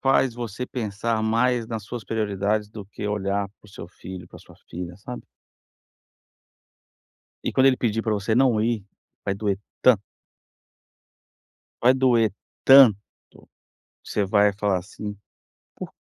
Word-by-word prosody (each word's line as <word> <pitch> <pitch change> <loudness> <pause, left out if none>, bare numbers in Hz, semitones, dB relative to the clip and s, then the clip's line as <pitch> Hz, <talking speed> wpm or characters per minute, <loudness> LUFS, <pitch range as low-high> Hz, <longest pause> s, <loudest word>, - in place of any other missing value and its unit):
faz 135 -2 +3
você 120 0 -5
pensar 110 -2 -2
mais 115 +1 +1
nas 115 -2 -5
suas 120 -2 -7
prioridades 105 0 -1
do 105 -2 -9
que 105 0 -6
olhar 100 -1 -1
para - - -19
o - - -17
seu - - -9
filho, 90 -2 -10
para - - -13
a - - -14
sua - - -17 0.2
filha, 90 0 -6
sabe? 125 +5 -8 2.2
E - - 0
quando 130 0 +4
ele 130 - +5
pedir 115 -2 -1
para 110 - 0
você 105 +2 -1
não 125 -4 +3
ir, 110 -3 0 0.4
vai 100 - -1
doer 100 -1 -1 0.2
tanto 115 -6 +5 1.8
vai 125 +2 +6
doer 120 -5 +3 0.3
tanto, 130 -6 +9 1.1
você 105 - -1
vai 100 +1 +4
falar 100 -2 0
assim: 105 +2 -8 0.6
"Por - - -7
110 Hz, 140 wpm, -24 LUFS, 100-120 Hz, 2.2 s, tanto